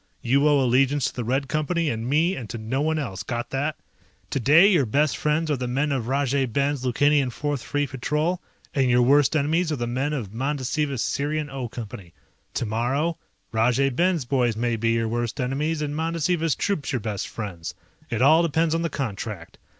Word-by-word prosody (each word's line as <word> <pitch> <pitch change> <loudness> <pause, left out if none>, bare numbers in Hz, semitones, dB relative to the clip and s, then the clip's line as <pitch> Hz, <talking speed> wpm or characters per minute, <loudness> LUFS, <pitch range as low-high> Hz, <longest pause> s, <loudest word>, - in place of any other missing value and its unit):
You 140 +5 +3
owe 145 -1 +4
allegiance 135 +2 +2
to - - -2
the 125 - -3
Red 135 +4 0
Company 155 +4 0
and 115 +2 -3
me 165 +6 +2
and 115 -5 -7
to - - -5
no 115 +5 -2
one 160 +1 +1
else. 115 -11 -4
Got 120 +3 -4
that? 145 +3 -1 0.5
Today 150 - +6
your 170 - +3
best 145 +4 +2
friends 155 +1 0
are 145 - +1
the 125 0 -3
men 140 +4 0
of 130 -5 -1
Rajay 135 0 +1
Ben's 140 +3 0
Lukanian 140 +2 +3
Fourth 145 +1 -2
Free 145 +4 -1
Patrol, 150 +7 -1 0.3
and 135 -3 +2
your 125 0 +4
worst 145 +4 +4
enemies 160 +3 +1
are - - +1
the 120 -3 -2
men 130 +5 -1
of 115 -9 -4
Mandasiva's 135 +1 -1
Sirian 150 +1 -2
O 130 -3 -4
Company. 105 -7 -8 0.4
Tomorrow 125 +9 -1 0.3
Rajay 125 +5 +2
Ben's 170 +1 +1
boys 120 -3 +1
may 120 0 0
be 115 +1 0
your 115 0 +1
worst 120 0 -2
enemies, 150 +5 -1
and 145 0 -3
Mandasiva's 165 0 0
troops 160 -10 -1
your 130 - 0
best 105 -3 -3
friends. 95 -7 -6 0.3
It 120 +1 0
all 155 +4 +6
depends 165 -1 +1
on 165 - 0
the 165 - -1
contract. 105 - -5
135 Hz, 190 wpm, -24 LUFS, 120-150 Hz, 0.5 s, Today